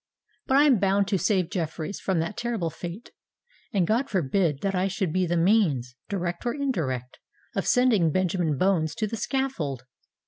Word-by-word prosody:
But 265 - +4
I 285 - +7
am 270 -7 +5
bound 195 0 +2
to 195 -3 +1
save 185 -2 +1
Jeffreys 165 +1 -3
from 190 -2 -1
that 165 +5 -4
terrible 225 -9 -2
fate; 175 +9 -8 0.6
and 195 -6 +2
God 235 +8 +1
forbid 165 -4 0
that 195 - 0
that - - -4
I 185 +1 +1
should 185 -3 -2
be 185 -1 +1
the 175 +1 0
means, 165 - +2
direct 175 -3 -3
or 240 -1 -1
indirect, 150 - -2 0.4
of - - -1
sending 230 - +4
Benjamin 175 -4 0
Bones 165 -3 +1
to 225 - -1
the 215 - -4
scaffold! 210 - -2
185 Hz, 180 wpm, -26 LUFS, 165-215 Hz, 0.6 s, I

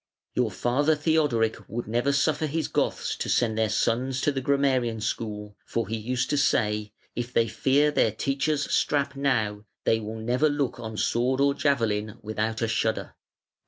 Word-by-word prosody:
Your 125 -3 +1
father 130 +10 +1
Theodoric 150 -8 +1
would 120 +3 -4
never 120 +5 +1
suffer 150 +2 +1
his 155 +1 -1
Goths - - -1
to - - -3
send 115 -3 +2
their 110 -1 +1
sons 125 +5 0
to 145 - +2
the 135 -1 -3
grammarian 130 -4 +1
school, 105 -1 -4
for 115 -3 -2
he 110 - -2
used 125 +3 -2
to 145 - +2
say: 105 -6 +1 0.2
'If 120 +1 -3
they 115 -2 +2
fear 135 +6 +2
their 115 - +3
teacher's 140 +6 0
strap 140 -1 +1
now 110 -7 0 0.2
they 115 - +2
will 110 +1 -6
never 125 +7 +1
look 145 -4 -1
on 110 -2 -6
sword 125 +5 +1
or 140 0 +4
javelin 110 -7 0
without 110 +2 -2
a - - +1
shudder.' 110 0 -1
120 Hz, 170 wpm, -26 LUFS, 110-140 Hz, 0.2 s, or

